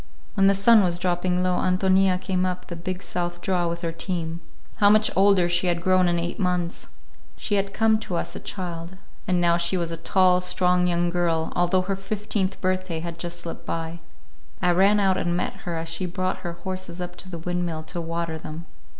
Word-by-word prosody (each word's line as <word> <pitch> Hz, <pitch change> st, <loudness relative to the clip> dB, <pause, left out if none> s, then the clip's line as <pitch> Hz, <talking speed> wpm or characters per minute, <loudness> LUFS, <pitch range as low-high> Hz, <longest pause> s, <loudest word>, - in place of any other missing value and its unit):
When 195 Hz, -2 st, +4 dB
the 195 Hz, -, +5 dB
sun 215 Hz, +3 st, +6 dB
was 175 Hz, -3 st, +1 dB
dropping 180 Hz, 0 st, 0 dB
low, 180 Hz, -1 st, +1 dB
Ántonia 185 Hz, 0 st, +3 dB
came 185 Hz, -1 st, -1 dB
up 180 Hz, 0 st, -2 dB
the 175 Hz, -, -7 dB
big 185 Hz, +2 st, -5 dB
south 175 Hz, -1 st, -3 dB
draw 175 Hz, -1 st, 0 dB
with 170 Hz, 0 st, -3 dB
her 165 Hz, -2 st, -2 dB
team. 165 Hz, -1 st, -4 dB, 0.4 s
How 205 Hz, -1 st, +5 dB
much 215 Hz, +1 st, +4 dB
older 195 Hz, -2 st, +5 dB
she 175 Hz, +1 st, +1 dB
had 170 Hz, -1 st, 0 dB
grown 185 Hz, -1 st, +4 dB
in 175 Hz, 0 st, +1 dB
eight 170 Hz, +5 st, -3 dB
months! 180 Hz, -2 st, -1 dB, 0.5 s
She 210 Hz, -, -3 dB
had 195 Hz, -1 st, +1 dB
come 220 Hz, +1 st, +3 dB
to 185 Hz, -4 st, -4 dB
us -, -, -3 dB
a -, -, -5 dB
child, 175 Hz, -1 st, -6 dB, 0.3 s
and 180 Hz, -2 st, +2 dB
now 170 Hz, -1 st, +3 dB
she 170 Hz, +2 st, 0 dB
was 170 Hz, -1 st, -1 dB
a 165 Hz, -, -3 dB
tall, 180 Hz, +2 st, +3 dB
strong 180 Hz, 0 st, +2 dB
young 175 Hz, 0 st, +1 dB
girl, 170 Hz, -2 st, 0 dB
although 175 Hz, +1 st, +2 dB
her 195 Hz, +1 st, -1 dB
fifteenth 195 Hz, 0 st, -2 dB
birthday 185 Hz, -3 st, -1 dB
had 170 Hz, 0 st, -6 dB
just 175 Hz, 0 st, -4 dB
slipped 170 Hz, -, -8 dB
by. 165 Hz, +1 st, -3 dB, 0.6 s
I 180 Hz, -1 st, +3 dB
ran 195 Hz, +4 st, +4 dB
out 190 Hz, -2 st, +3 dB
and 175 Hz, 0 st, 0 dB
met -, -, -1 dB, 0.2 s
her 170 Hz, -, -2 dB
as 165 Hz, 0 st, -4 dB
she 165 Hz, +3 st, -2 dB
brought 185 Hz, +1 st, -2 dB
her 175 Hz, -2 st, -5 dB
horses 185 Hz, 0 st, -6 dB
up 175 Hz, 0 st, -5 dB
to 185 Hz, -, -9 dB
the 175 Hz, -, -6 dB
windmill 170 Hz, -1 st, -3 dB
to 170 Hz, +2 st, -5 dB
water 165 Hz, -1 st, -3 dB
them. 155 Hz, +2 st, -8 dB
180 Hz, 210 wpm, -24 LUFS, 170-185 Hz, 0.6 s, sun